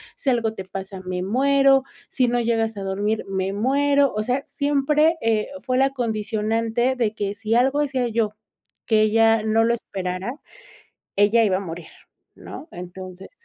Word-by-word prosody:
si 275 - -2
algo 230 -3 +1
te 190 -3 -7
pasa, 190 0 -7
me 180 0 -3
muero, 270 +5 +3 0.3
si 255 - +1
no 240 0 +1
llegas 225 -2 0
a 200 - -4
dormir, 205 +3 -1
me 190 0 -2
muero, 280 +5 +2
o 215 - 0
sea, 255 +5 -1
siempre, 295 +3 +2
eh, 220 -2 +1
fue 255 -1 -1
la 270 0 +4
condicionante 225 0 -1
de 230 -4 0
que 205 -2 -2
si 220 +2 -1
algo 265 +4 +3
hacía 265 -4 0
yo, 215 -2 -1 0.5
que 220 -2 +3
ella 225 +1 +4
no 220 +1 +2
lo 235 - +2
esperara, 190 0 -4 0.8
ella 205 +3 +4
iba 190 -3 +2
a - - -5
morir, 170 -3 -7 0.5
¿no? 315 - -10
Entonces 180 +1 -9
225 Hz, 165 wpm, -23 LUFS, 200-255 Hz, 0.8 s, la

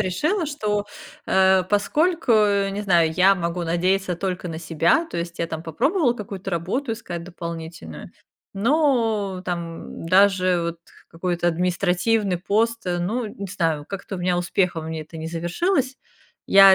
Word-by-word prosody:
решила, 300 - 0
что, 210 -8 -1 0.4
э, 190 0 +4
поскольку, 245 - +1
не 200 -2 +2
знаю, 170 -5 +3
я 190 +3 +5
могу 170 -1 -2
надеяться 180 +2 0
только 180 -1 -3
на 160 -1 -5
себя, 170 - +2
то - - -5
есть 170 0 -4
я 170 - 0
там 160 -1 -5
попробовала 250 - +1
какую-то 195 -3 -6
работу 190 - -2
искать 175 -7 -6
дополнительную 165 - -8 0.4
Но 225 -5 +1
там 170 -2 -5
даже 185 -1 +4
вот 170 0 -3 0.3
какой-то 175 +1 -1
административный 180 +3 +1
пост, 225 +3 0
э, 175 -1 0
ну, 220 +8 -1
не 200 -1 -7
знаю, 165 -6 -1
как-то 195 0 -6
у - - -6
меня 180 0 +1
успехом 175 -2 0
у - - -5
меня 160 -1 -4
это 155 +2 -12
не 160 0 -5
завершилось. 260 - -1 0.5
Я 195 -1 +8
185 Hz, 150 wpm, -23 LUFS, 170-210 Hz, 0.5 s, Я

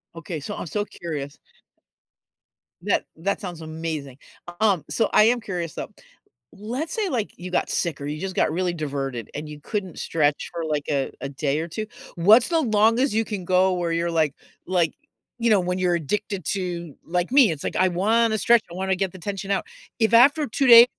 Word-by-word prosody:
Okay, 165 -1 -5
so - - -5
I'm - - -5
so 205 +5 -1
curious 150 -8 -6 1.5
That - - +1
that 200 +5 -2
sounds 175 -4 -6
amazing. 155 -4 -5 0.4
Um, 200 -7 +3
so 225 - +1
I - - +7
am 240 +2 +4
curious 175 -7 -4
though, - - -5 0.6
let's 250 +10 -5
say, 430 -4 -1
like, 235 -8 -2
you 180 +1 -7
got - - 0
sick 165 -5 -1
or 140 - -6
you 150 +1 -4
just 190 -1 -4
got - - +2
really 175 +1 0
diverted 135 -7 -4
and 150 +1 -6
you 150 - -9
couldn't 190 -3 -4
stretch 150 -3 0
for, 170 -1 -3
like, 150 -2 -1
a 140 -2 0
a 140 - -4
day 140 +1 -1
or 165 - -3
2. 215 +6 -5 0.3
What's 215 - +6
the 330 -2 +2
longest 225 +2 +3
you 225 +1 +1
can 200 -5 -5
go 185 +1 +3
where 175 -2 -1
you're 170 +1 0
like 155 -4 +1 0.3
like, 175 -3 +1 0.5
you 235 0 +2
know, 210 - +5
when 180 0 -1
you're 180 -1 +2
addicted 195 +4 -3
to 175 -5 -4
like 180 +5 -1
me, 265 -7 +6
it's 150 -3 -5
like, - - -3
I 185 - +4
wanna 220 +5 +2
stretch, 235 +2 +5
I - - -8
wanna 190 +1 0
get 190 -1 -1
the 185 - -12
tension 195 +1 -5
out. 200 - 0 0.3
If 220 0 +2
after 280 +6 +6
2 265 +4 0
days 235 0 +11
180 Hz, 205 wpm, -24 LUFS, 160-215 Hz, 1.5 s, days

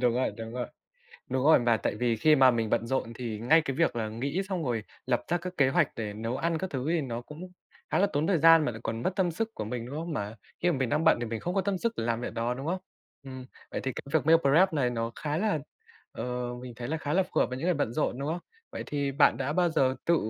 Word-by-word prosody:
Đúng 120 -2 +3
rồi, 130 - +1
đúng 115 -1 -7
rồi. 125 0 -3 0.6
Đúng 130 - 0
rồi, 160 +2 +7
mà 120 -2 +3
tại - - -2
vì 120 -2 +1
khi 155 +7 +5
mà 130 -2 +7
mình 115 -3 -1
bận 115 - +1
rộn 125 -2 -1
thì 115 -3 -4
ngay 125 +9 +5
cái 135 -3 -3
việc 165 -6 +2
là 110 -2 -1
nghĩ 140 - -2
xong 180 -5 -2
rồi 115 -4 -1 0.2
lập 125 -2 +1
ra 175 - +2
các 180 +1 -7
kế 135 - +4
hoạch 155 +1 +3
để 110 -2 -3
nấu 115 +4 -3
ăn 165 +2 0
các 190 +2 -4
thứ 130 -2 -3
thì 165 0 +2
nó 120 -4 -4
cũng 160 +8 -10 0.4
khá - - +2
là 200 - +4
tốn 145 +2 +1
thời 190 -4 +3
gian 165 0 +7
mà 120 - -1
lại 110 - -9
còn 115 +1 -3
mất 185 - 0
tâm 185 -3 +2
sức 225 +7 -3
của - - -4
mình, 115 +2 -4
đúng 130 - -7
không? 165 +1 -4
Mà 105 -5 -4 0.3
khi 175 - +3
mà 160 - 0
mình 130 - 0
đang 150 +6 +1
bận 160 - +5
thì 120 - -2
mình 110 -1 -4
không 175 +2 -3
có 195 - +3
tâm 190 0 -1
sức 230 +4 0
để - - -2
làm 115 0 0
việc - - -5
đó, 120 +2 -1
đúng 135 +3 -6
không? 180 +3 0 0.5
Ừm, 130 -1 -8 0.3
vậy - - -3
thì 130 - -3
cái - - -6
việc 160 -1 +2
meal 165 - +8
prep 165 +6 +4
này 135 -5 +1
nó 115 -1 -2
khá 150 0 -3
là 210 -5 +1 0.5
ờ, 125 0 -3
mình 125 -1 -7
thấy 120 0 -5
là 160 - -1
khá 150 -2 -3
là 190 +4 +4
phù 185 - -1
hợp - - +3
với 125 - -5
những 135 - -5
người 180 0 +2
bận 145 -6 -1
rộn, 130 -2 -1
đúng 140 +1 -3
không? 170 +3 -2 0.3
Vậy - - -4
thì 140 -1 -1
bạn 140 +2 +4
đã 135 +2 -2
bao 175 +2 +3
giờ 135 -5 +2
tự 170 - +4
135 Hz, 300 wpm, -28 LUFS, 120-165 Hz, 0.6 s, meal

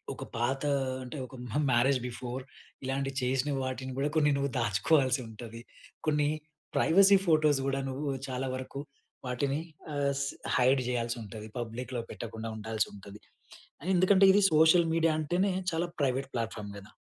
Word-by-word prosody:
ఒక - - -7
పాత 125 +4 0 0.4
అంటే, 125 +4 -7
ఒక 130 - -13 0.2
మహ్ 150 +7 +1
మ్యారేజ్ 130 +3 +4
బిఫోర్ 125 +1 -5 0.4
ఇలాంటివి 135 +1 -2
చేసిన 130 +3 +1
వాటిని 130 0 -4
కూడా 145 +2 +1
కొన్ని 150 -2 +4
నువ్వు 140 0 -1
దాచుకోవాల్సి 130 - +2
ఉంటది. 115 +1 -9 0.5
కొన్ని 150 -1 +2 0.5
ప్రైవసీ 195 +4 +6
ఫోటోస్ 155 -4 +4
గూడా 135 0 0
నువ్వు 140 +2 -3 0.2
చాలా 130 +1 -2
వరకు 130 +1 -6 0.5
వాటిని 135 +3 0 0.4
ఆహ్, 140 -1 +1
స్ 140 - 0 0.3
హైడ్ 130 +2 +4
చేయాల్సి 120 -1 -1
ఉంటది. 110 0 -8
పబ్లిక్‌లో 120 +1 -4
పెట్టకుండా 115 0 -6
ఉండాల్సి 110 0 -1
ఉంటది. 100 +1 -11 0.8
ఎందుకంటే 185 +2 +5
ఇది 205 +2 +5
సోషల్ 160 +2 +6
మీడియా 165 0 +3
అంటేనే 180 +6 +1 0.2
చాలా 165 +1 -1
ప్రైవేట్ 135 0 0
ప్లాట్ 115 -2 -1
‌ఫార్మ్ 105 -1 -6
గదా! 100 +2 -12
130 Hz, 150 wpm, -30 LUFS, 120-150 Hz, 0.8 s, ప్రైవసీ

